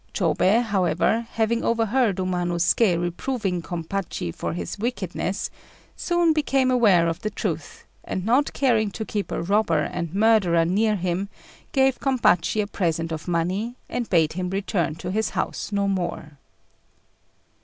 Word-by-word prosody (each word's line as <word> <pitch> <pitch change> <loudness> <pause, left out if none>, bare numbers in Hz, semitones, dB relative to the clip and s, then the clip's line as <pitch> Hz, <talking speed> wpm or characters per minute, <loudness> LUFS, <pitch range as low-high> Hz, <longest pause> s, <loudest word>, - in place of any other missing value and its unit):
Chôbei, 220 +6 +3
however, 210 +2 +1
having 230 +1 0
overheard 230 -1 +2
Umanosuké 180 +1 +1
reproving 180 +2 -2
Gompachi 170 - -4
for - - -4
his 175 - -5
wickedness, 200 -4 -3 0.4
soon 345 -2 +2
became 270 -4 +1
aware 205 -9 +4
of 165 0 -2
the 215 - -2
truth; 205 - -5 0.2
and 185 - -4
not 255 +6 +2
caring 230 -6 +2
to 220 +2 -5
keep 205 -2 -3
a - - -2
robber 180 -5 +2
and 170 +1 -4
murderer 200 -6 +4
near 210 +5 +2
him, 185 +1 -2 0.4
gave 265 -2 +2
Gompachi 220 -6 +2
a - - -3
present 165 -4 -2
of 160 +1 -5
money, 185 +8 -1
and 240 -2 -3
bade 160 -4 +3
him 180 +1 -3
return 185 -5 -1
to 180 +2 -5
his 220 +3 0
house - - -3
no 200 -1 +1
more. 175 -6 -3
195 Hz, 145 wpm, -24 LUFS, 175-225 Hz, 0.4 s, aware